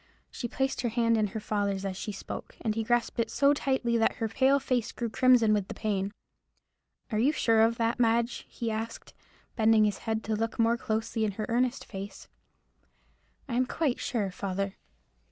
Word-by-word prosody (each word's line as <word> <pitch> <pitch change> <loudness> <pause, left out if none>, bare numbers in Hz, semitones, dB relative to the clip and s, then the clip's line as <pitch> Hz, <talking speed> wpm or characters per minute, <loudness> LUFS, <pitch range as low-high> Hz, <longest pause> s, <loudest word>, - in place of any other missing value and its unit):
She 240 - -4
placed 265 +2 -1
her 240 - 0
hand 230 0 +2
in 215 -1 +2
her 210 +3 -5
father's 200 -2 -1
as 190 -1 -3
she 210 - -4
spoke, 195 - -7
and 220 - 0
he 225 +1 -1
grasped 240 +1 0
it 230 - +1
so 280 0 +4
tightly 265 -5 0
that 225 - +2
her 225 - -1
pale 265 +5 +3
face 250 -4 -1
grew 235 -2 -4
crimson 245 -4 +5
with 205 -2 0
the - - -7
pain. 200 -2 -1 1.0
"Are 215 - +1
you 265 +6 +4
sure 225 -7 +3
of 230 +1 +3
that, 230 0 0
Madge?" 235 0 +1
he 230 -1 -3
asked, 225 +1 -5 0.4
bending 220 -1 +5
his 205 -2 -1
head 220 -1 -2
to 220 - -1
look 225 +1 -2
more 230 0 +3
closely 220 0 -2
in 210 -2 0
her 215 +2 -3
earnest 250 +2 0
face. 195 -1 -8 1.2
"I 255 - -5
am 250 +1 +2
quite 285 -4 0
sure, 210 -6 -1
father." 195 +1 -3
225 Hz, 190 wpm, -29 LUFS, 215-240 Hz, 1.2 s, crimson